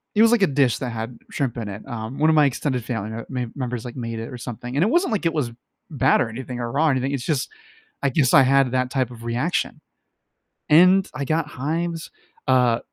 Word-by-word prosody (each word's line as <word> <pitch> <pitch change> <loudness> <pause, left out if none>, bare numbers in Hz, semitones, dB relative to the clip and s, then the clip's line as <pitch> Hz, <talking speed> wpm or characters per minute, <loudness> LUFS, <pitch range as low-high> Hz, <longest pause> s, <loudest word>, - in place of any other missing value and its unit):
it 210 - +5
was 230 0 +6
like 240 -3 +3
a 195 - +5
dish 135 -4 +2
that 125 - -3
had 115 +1 -5
shrimp 135 -5 -2
in 110 -3 -4
it, 100 +5 -8
um, 115 0 -6
one 155 +1 +4
of 160 - +4
my 150 -1 +6
extended 130 -2 -1
family 110 -3 -4
m 115 - -7
ma 125 -2 -2
members, 125 -3 -4
like, 120 - -7
made 115 -3 -4
it 115 - -6
or 125 - -7
something. 120 +1 -6
And 145 - +3
it 205 - +2
wasn't 345 +2 +2
like 195 -5 -1
it 165 - -1
was 140 -7 -1 0.4
bad 135 -3 +3
or 120 - 0
anything, 125 +1 -6
or 120 -1 -3
raw 150 +5 +2
or - - +4
anything, 130 0 0
it's 130 -4 -3
just 145 -5 -1 0.5
I 140 - +3
guess 130 -1 +2
I 135 - +8
had 135 -1 +3
that 130 0 0
type 130 -3 0
of 115 -1 -11
reaction. 120 +9 -1 0.9
And 185 +5 +6
I 145 -2 -3
got 160 +2 0
hives, 165 +4 -3 0.4
uh, 125 -3 +3
130 Hz, 240 wpm, -23 LUFS, 120-150 Hz, 0.9 s, I